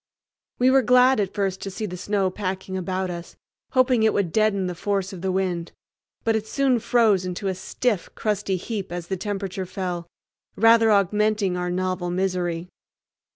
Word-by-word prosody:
We 255 Hz, +1 st, +4 dB
were 270 Hz, 0 st, +5 dB
glad 250 Hz, +1 st, +5 dB
at 195 Hz, -2 st, -1 dB
first 195 Hz, -2 st, -1 dB
to 195 Hz, -, -4 dB
see 205 Hz, +3 st, -4 dB
the 180 Hz, -3 st, -5 dB
snow 195 Hz, +1 st, 0 dB
packing 190 Hz, -1 st, -4 dB
about 185 Hz, 0 st, -2 dB
us, 170 Hz, 0 st, -8 dB, 0.4 s
hoping 255 Hz, -2 st, +4 dB
it 220 Hz, 0 st, +3 dB
would 190 Hz, -5 st, 0 dB
deaden 215 Hz, -2 st, +2 dB
the 180 Hz, -, -2 dB
force 195 Hz, +2 st, -2 dB
of 180 Hz, -, -8 dB
the 190 Hz, 0 st, -1 dB
wind, 180 Hz, -3 st, -2 dB, 0.5 s
but 225 Hz, -1 st, +2 dB
it 220 Hz, 0 st, -2 dB
soon 265 Hz, -2 st, +2 dB
froze 225 Hz, -4 st, +3 dB
into 185 Hz, +2 st, -4 dB
a -, -, 0 dB
stiff, 190 Hz, +2 st, -2 dB
crusty 205 Hz, -3 st, -1 dB
heap 195 Hz, -1 st, -5 dB
as 175 Hz, -1 st, -5 dB
the 190 Hz, -, 0 dB
temperature 195 Hz, -1 st, -4 dB
fell, 180 Hz, -2 st, -4 dB, 0.5 s
rather 225 Hz, +1 st, +5 dB
augmenting 210 Hz, -1 st, +2 dB
our 180 Hz, 0 st, -2 dB
novel 185 Hz, 0 st, -1 dB
misery. 180 Hz, -2 st, -1 dB
195 Hz, 175 wpm, -24 LUFS, 180-215 Hz, 0.5 s, were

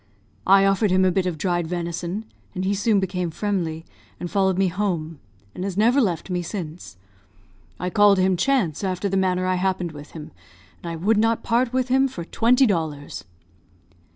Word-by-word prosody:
I 195 Hz, +1 st, +6 dB
offered 195 Hz, +2 st, +2 dB
him 185 Hz, +1 st, +3 dB
a 185 Hz, -, +3 dB
bit 185 Hz, 0 st, 0 dB
of 175 Hz, -3 st, -3 dB
dried 175 Hz, +1 st, -1 dB
venison, 175 Hz, +4 st, -4 dB, 0.3 s
and 185 Hz, +1 st, -2 dB
he 195 Hz, -, +1 dB
soon 205 Hz, +1 st, +2 dB
became 180 Hz, -2 st, -2 dB
friendly, 165 Hz, -3 st, -3 dB, 0.3 s
and 175 Hz, -, -5 dB
followed 190 Hz, -2 st, +2 dB
me 195 Hz, 0 st, +3 dB
home, 170 Hz, -5 st, -2 dB, 0.3 s
and 180 Hz, -, -6 dB
has 195 Hz, -1 st, -4 dB
never 240 Hz, +6 st, +4 dB
left 185 Hz, -4 st, -1 dB
me 180 Hz, 0 st, 0 dB
since. 170 Hz, -, -7 dB, 0.8 s
I 180 Hz, +1 st, -3 dB
called 205 Hz, 0 st, +5 dB
him 185 Hz, 0 st, +3 dB
Chance, 185 Hz, -, 0 dB
after 190 Hz, +1 st, -1 dB
the 195 Hz, -, -2 dB
manner 185 Hz, -1 st, +1 dB
I 185 Hz, 0 st, +1 dB
happened 185 Hz, -3 st, -1 dB
with 145 Hz, -1 st, -12 dB
him; 155 Hz, -2 st, -9 dB, 0.5 s
and 170 Hz, -, -6 dB
I -, -, -4 dB
would 205 Hz, +7 st, +1 dB
not 225 Hz, +1 st, +1 dB
part 235 Hz, +1 st, +1 dB
with 255 Hz, 0 st, -1 dB
him 265 Hz, +1 st, +3 dB
for 175 Hz, -10 st, -7 dB
twenty 245 Hz, +8 st, +3 dB
dollars." 160 Hz, -, -3 dB
185 Hz, 185 wpm, -23 LUFS, 175-205 Hz, 0.8 s, I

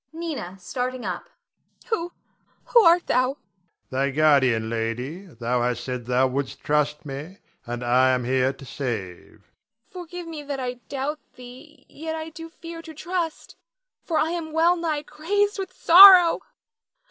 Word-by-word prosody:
Nina 315 Hz, -, -6 dB
[starting 250 Hz, +7 st, -4 dB
up]. -, -, -5 dB, 0.6 s
Who 350 Hz, -5 st, -1 dB, 0.5 s
who 475 Hz, -, +5 dB
art 345 Hz, 0 st, +5 dB
thou? 255 Hz, +1 st, +1 dB
Adrian. 290 Hz, -, -29 dB, 0.5 s
Thy 135 Hz, +1 st, 0 dB
guardian. 135 Hz, -6 st, +3 dB
Lady, 120 Hz, -, -4 dB
thou 120 Hz, -4 st, -2 dB
hast 120 Hz, 0 st, -1 dB
said 125 Hz, -1 st, -5 dB
thou 125 Hz, +1 st, +3 dB
wouldst 130 Hz, +1 st, -3 dB
trust 150 Hz, 0 st, 0 dB
me, 150 Hz, +7 st, -8 dB, 0.3 s
and 120 Hz, +1 st, -5 dB
I 125 Hz, +2 st, +3 dB
am 130 Hz, -1 st, +1 dB
here 130 Hz, +1 st, +1 dB
to 135 Hz, 0 st, -13 dB
save. 115 Hz, -9 st, -5 dB, 0.3 s
Nina. 225 Hz, +1 st, -46 dB
Forgive 355 Hz, -1 st, -8 dB
me 320 Hz, -2 st, -7 dB
that 285 Hz, -1 st, -5 dB
I 250 Hz, -1 st, -4 dB
doubt 285 Hz, +2 st, -3 dB, 0.2 s
thee; 260 Hz, +4 st, -14 dB
yet 320 Hz, +1 st, -6 dB
I 320 Hz, 0 st, -6 dB
do 330 Hz, +1 st, -10 dB
fear 330 Hz, 0 st, -10 dB
to 320 Hz, -1 st, -12 dB
trust, 345 Hz, 0 st, -4 dB, 0.5 s
for 325 Hz, -, -2 dB
I 320 Hz, -, +1 dB
am 335 Hz, -2 st, -4 dB
well 335 Hz, +2 st, +4 dB
nigh 320 Hz, -4 st, -2 dB
crazed 405 Hz, +8 st, -1 dB
with 380 Hz, -1 st, -4 dB
sorrow. 360 Hz, -1 st, +8 dB
255 Hz, 160 wpm, -24 LUFS, -, 0.6 s, sorrow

